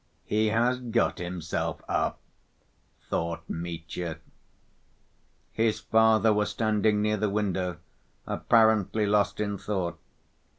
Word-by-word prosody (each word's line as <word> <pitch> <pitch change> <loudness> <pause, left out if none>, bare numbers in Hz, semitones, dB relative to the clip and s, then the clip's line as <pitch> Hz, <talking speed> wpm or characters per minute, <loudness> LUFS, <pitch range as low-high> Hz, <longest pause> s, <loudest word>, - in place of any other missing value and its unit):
"He 110 +1 +1
has 120 +4 +2
got 120 -2 0
himself 85 -2 -3
up," - - 0 0.9
thought 85 0 -3
Mitya. 85 0 -5 1.3
His 110 -1 +1
father 110 0 +4
was 105 0 +1
standing 105 -1 +1
near 105 0 +1
the 105 0 0
window, 95 -4 -1 0.5
apparently 110 -2 +3
lost 105 0 +1
in 100 -2 -2
thought. 90 -5 -3
105 Hz, 100 wpm, -27 LUFS, 90-110 Hz, 1.3 s, father